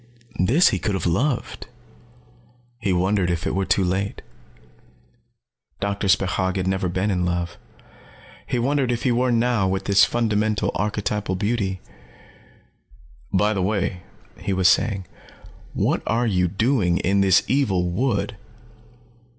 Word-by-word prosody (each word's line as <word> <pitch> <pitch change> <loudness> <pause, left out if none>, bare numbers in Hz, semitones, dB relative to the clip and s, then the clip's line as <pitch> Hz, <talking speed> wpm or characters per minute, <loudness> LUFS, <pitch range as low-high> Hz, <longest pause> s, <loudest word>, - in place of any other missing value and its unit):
This 125 - +4
he - - -1
could 105 -3 -1
have 95 - -3
loved. 120 - -1 1.1
He 105 -4 -1
wondered 90 +1 +1
if 85 0 -2
it - - -1
were 95 0 0
too 100 - +2
late. 95 +2 -2 1.6
Doctor 100 0 -2
Spechaug 95 0 +1
had 95 -1 -1
never 95 -1 0
been 95 +4 -1
in 90 -2 0
love. 85 -1 -2 0.9
He - - -1
wondered 130 +1 +1
if 120 - -2
he 130 - +2
were 125 +1 +1
now 115 -4 +2
with 95 +1 -2
this 100 0 +5
fundamental 110 -2 +1
archetypal 105 -1 -2
beauty. 100 -2 -2 1.5
"By 105 +3 +2
the 95 - -1
way," 95 -1 -1 0.4
he 100 - -2
was 95 -1 +3
saying, 100 -3 +2 0.7
"what - - +1
are 120 +2 +1
you 90 -5 +1
doing 100 -2 +1
in 100 +2 +1
this 95 -1 +4
evil 100 -10 +1
wood?" 100 +1 -1
100 Hz, 135 wpm, -22 LUFS, 95-115 Hz, 1.6 s, this